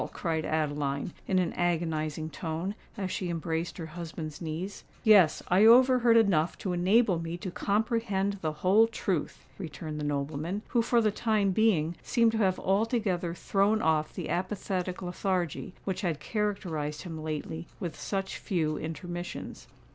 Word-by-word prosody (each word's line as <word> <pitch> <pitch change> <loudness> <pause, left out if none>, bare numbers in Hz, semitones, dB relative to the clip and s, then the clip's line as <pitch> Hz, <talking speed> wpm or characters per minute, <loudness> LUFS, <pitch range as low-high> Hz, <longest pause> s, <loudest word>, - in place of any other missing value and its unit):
cried 160 -2 -1
Adeline, 145 -1 -1
in 190 - +2
an 180 -2 +1
agonising 160 -3 -1
tone, 160 +4 -3 0.2
as 190 -2 -2
she 185 - -2
embraced 165 0 -2
her 165 - -5
husband's 160 -1 -7
knees. 170 +5 -5 0.2
"Yes—I 195 -2 +5
overheard 245 0 +7
enough 180 -7 +3
to 185 - -3
enable 185 +1 +3
me 165 +1 -4
to 185 0 -5
comprehend 205 -1 0
the 155 - 0
whole 215 +5 +6
truth," 195 -7 -3
returned 155 -3 -6
the - - -3
nobleman, 145 +7 -2
who 240 - +3
for 235 +1 +3
the 215 -1 +2
time 210 -2 +1
being 180 -6 +2
seemed 230 -1 +3
to 225 - -1
have 190 -3 +2
altogether 195 -4 0
thrown 200 +4 +2
off 155 -4 +1
the - - -4
apathetic 185 0 -2
lethargy 180 -1 -2
which 190 -2 -2
had 165 -5 -1
characterised 175 -8 -2
him 165 -4 -6
lately 155 +1 -4
with 170 -5 -4
such 195 -1 -3
few 160 -6 -1
intermissions. 175 +3 -6
180 Hz, 145 wpm, -29 LUFS, 160-205 Hz, 0.2 s, overheard